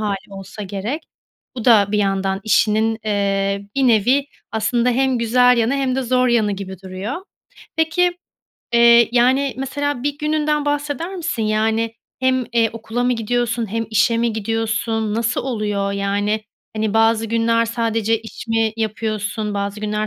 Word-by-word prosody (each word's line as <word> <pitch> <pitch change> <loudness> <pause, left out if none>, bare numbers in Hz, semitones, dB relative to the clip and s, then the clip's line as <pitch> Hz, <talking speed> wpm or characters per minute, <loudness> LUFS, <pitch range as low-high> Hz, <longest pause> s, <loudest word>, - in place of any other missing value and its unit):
hâli 205 -2 -1 0.2
olsa 195 +2 -8
gerek. 205 - -4 0.5
Bu 235 - -5
da 220 -5 +6
bir 210 - +2
yandan 195 -1 0
işinin, 220 +1 +2
eee, 200 -1 0
bir 270 -1 +2
nevi 245 +6 +3 0.3
aslında 235 +3 +1
hem 260 0 +1
güzel 245 +2 +4
yanı 230 +3 +2
hem 265 -2 0
de 265 - 0
zor 255 0 +2
yanı 220 -4 +2
gibi 190 -2 -7
duruyor. 190 +6 -5 0.6
Peki, 340 +2 +2 0.6
eee, 235 -1 +6
yani, 260 +3 +3
mesela 280 0 -3
1 290 +1 -2
gününden 300 -1 0
bahseder 290 +4 -2
misin? 330 -10 -3
Yani, 220 +1 0 0.3
hem, 260 -1 +2
eee, 230 -2 +3
okula 230 +2 -3
mı 250 - +2
gidiyorsun 235 -1 -1
hem 225 0 -1
işe 220 +2 +3
mi 235 0 +1
gidiyorsun? 225 0 -1
Nasıl 230 +2 0
oluyor? 210 -5 -2
Yani, 205 +2 0 0.4
hani, 215 -1 -1
bazı 225 0 +3
günler 230 +1 +2
sadece 225 -1 0
iş 225 +1 -10
mi 225 -1 +1
yapıyorsun, 215 -1 -2
bazı 200 +1 -3
günler 215 0 -1
225 Hz, 155 wpm, -20 LUFS, 210-250 Hz, 0.6 s, da